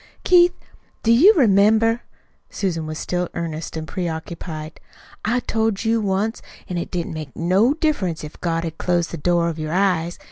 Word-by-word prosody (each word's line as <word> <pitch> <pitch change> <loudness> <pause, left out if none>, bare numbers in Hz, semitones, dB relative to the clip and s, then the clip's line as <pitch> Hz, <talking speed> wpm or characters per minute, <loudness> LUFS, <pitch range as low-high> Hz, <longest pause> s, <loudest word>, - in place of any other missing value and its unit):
"Keith, 355 0 +5 0.5
do 230 - +3
you 300 - +8
remember?" 225 - +4 0.5
Susan 165 -6 -2
was 155 0 -5
still 180 +1 -2
earnest 165 -1 -4
and 155 0 -5
preoccupied. 160 -2 -5 0.4
"I 240 +3 +1
told 220 -2 -1
you 225 0 +2
once 205 +3 -1 0.3
that 180 -1 -3
it - - -5
didn't 170 -2 -3
make 155 -4 -7
no 195 - +2
diff'rence 210 - -1
if 150 - -10
God 165 -1 -1
had 165 -1 -6
closed 175 -2 0
the 170 - -4
door 170 +2 +1
of 165 -1 -3
your 155 +1 -3
eyes. 180 -3 +1
180 Hz, 170 wpm, -21 LUFS, 165-220 Hz, 0.5 s, you